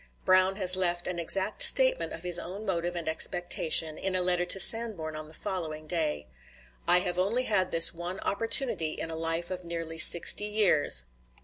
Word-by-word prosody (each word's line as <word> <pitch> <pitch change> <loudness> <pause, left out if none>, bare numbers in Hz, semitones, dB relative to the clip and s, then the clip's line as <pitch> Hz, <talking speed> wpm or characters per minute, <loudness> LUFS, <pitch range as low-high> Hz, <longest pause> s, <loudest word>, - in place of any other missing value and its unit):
Brown 185 +1 +1
has 185 -2 +5
left 175 -2 -3
an 180 -1 -5
exact 190 - -2
statement - - +3
of 165 - -10
his 175 -1 -1
own 195 +5 -10
motive 175 -2 -5
and 170 -2 -7
expectation, 160 -1 0
in 190 -1 -5
a 185 - -2
letter 180 -1 -2
to 195 - +1
Sanborn 195 -7 +4
on 155 0 -10
the 155 - -17
following 155 -4 -8
day. 155 - -5 0.6
"I 180 - +3
have 180 -1 -5
only 220 +7 -3
had 190 -6 -2
this 165 0 +7
one 175 +3 -9
opportunity 225 - -1
in 165 - -8
a - - -8
life 165 +2 -6
of 185 0 -8
nearly 165 -1 -8
sixty 175 +5 +5
years 190 - +1
175 Hz, 185 wpm, -25 LUFS, 165-195 Hz, 0.6 s, this